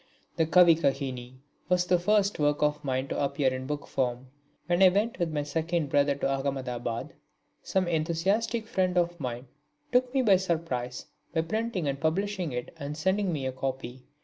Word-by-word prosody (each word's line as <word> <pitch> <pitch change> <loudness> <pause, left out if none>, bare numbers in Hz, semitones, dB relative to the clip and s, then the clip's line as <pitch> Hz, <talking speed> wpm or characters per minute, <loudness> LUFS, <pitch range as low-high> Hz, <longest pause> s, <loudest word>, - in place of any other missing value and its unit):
The 160 -2 +1
Kavikahini 140 -8 +3 0.3
was 180 -1 +3
the 180 0 +3
first 200 +1 +2
work 145 0 +2
of 150 0 +1
mine 130 -1 -1
to - - -1
appear 140 -1 +1
in 130 0 -5
book 150 0 -3
form. 125 0 -2 0.3
When 175 +1 +1
I 190 - +9
went 205 +5 0
with 170 -2 0
my 150 -1 -1
second 160 +1 -1
brother 145 0 +3
to 140 - -1 0.2
Ahmedabad, 125 -4 -3 0.5
some 190 -2 0
enthusiastic 180 +8 0
friend 185 -3 0
of 175 0 +1
mine 125 -2 -4 0.5
took 250 0 +3
me 265 -1 +2
by 200 -5 +6
surprise 155 -9 -2 0.3
by 160 - +3
printing 205 -1 -2
and 140 0 -2
publishing 185 +1 -1
it 125 -1 -5
and 145 +1 -5
sending 190 +3 +1
me 145 -5 -3
a 130 - -1
copy. 130 -1 -5
160 Hz, 175 wpm, -28 LUFS, 135-185 Hz, 0.5 s, I